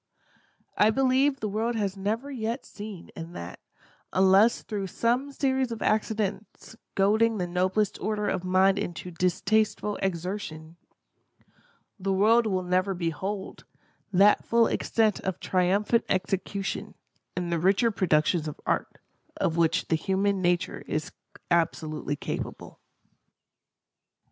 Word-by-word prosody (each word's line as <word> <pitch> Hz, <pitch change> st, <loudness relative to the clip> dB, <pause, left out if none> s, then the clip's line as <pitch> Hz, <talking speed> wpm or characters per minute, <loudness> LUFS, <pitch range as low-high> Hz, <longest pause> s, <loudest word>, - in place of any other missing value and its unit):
I 210 Hz, -, +6 dB
believe 270 Hz, +3 st, +2 dB
the 215 Hz, -, -1 dB
world 220 Hz, +3 st, -1 dB
has 200 Hz, -3 st, -1 dB
never 220 Hz, +8 st, -2 dB
yet 235 Hz, 0 st, -3 dB
seen, 205 Hz, -4 st, -9 dB
and 165 Hz, +1 st, -8 dB
that, 85 Hz, +1 st, -7 dB, 0.5 s
unless 195 Hz, +4 st, +4 dB
through 200 Hz, -3 st, -4 dB
some 245 Hz, +8 st, 0 dB
series 265 Hz, -2 st, 0 dB
of 230 Hz, -, -4 dB
accidents 215 Hz, -1 st, -2 dB, 0.2 s
goading 215 Hz, +3 st, +3 dB
the 180 Hz, -, -1 dB
noblest 185 Hz, +4 st, 0 dB
order 210 Hz, 0 st, -1 dB
of 190 Hz, -3 st, -1 dB
mind 190 Hz, +2 st, +3 dB
into 175 Hz, +1 st, -5 dB
distasteful 205 Hz, +5 st, 0 dB
exertion, 170 Hz, -3 st, -4 dB, 1.2 s
the 195 Hz, +1 st, -1 dB
world 220 Hz, +4 st, +4 dB
will 185 Hz, -3 st, 0 dB
never 185 Hz, +2 st, +1 dB
behold, 185 Hz, +4 st, -4 dB, 0.5 s
that 200 Hz, +2 st, +5 dB
full 230 Hz, 0 st, +3 dB
extent 220 Hz, -2 st, +1 dB
of 190 Hz, -2 st, -3 dB
triumphant 195 Hz, +5 st, +2 dB
execution, 195 Hz, +1 st, -2 dB, 0.4 s
in 175 Hz, -1 st, -2 dB
the 170 Hz, -, +1 dB
richer 195 Hz, +7 st, +3 dB
productions 160 Hz, -4 st, +1 dB
of 150 Hz, -, -7 dB
Art, -, -, -1 dB, 0.4 s
of 160 Hz, -, 0 dB
which 165 Hz, -1 st, +1 dB
the 160 Hz, -, +3 dB
human 195 Hz, +3 st, 0 dB
nature 175 Hz, 0 st, 0 dB
is 155 Hz, -, -3 dB, 0.4 s
absolutely 155 Hz, -3 st, 0 dB
capable. -, -, -6 dB
195 Hz, 125 wpm, -27 LUFS, 180-220 Hz, 1.2 s, I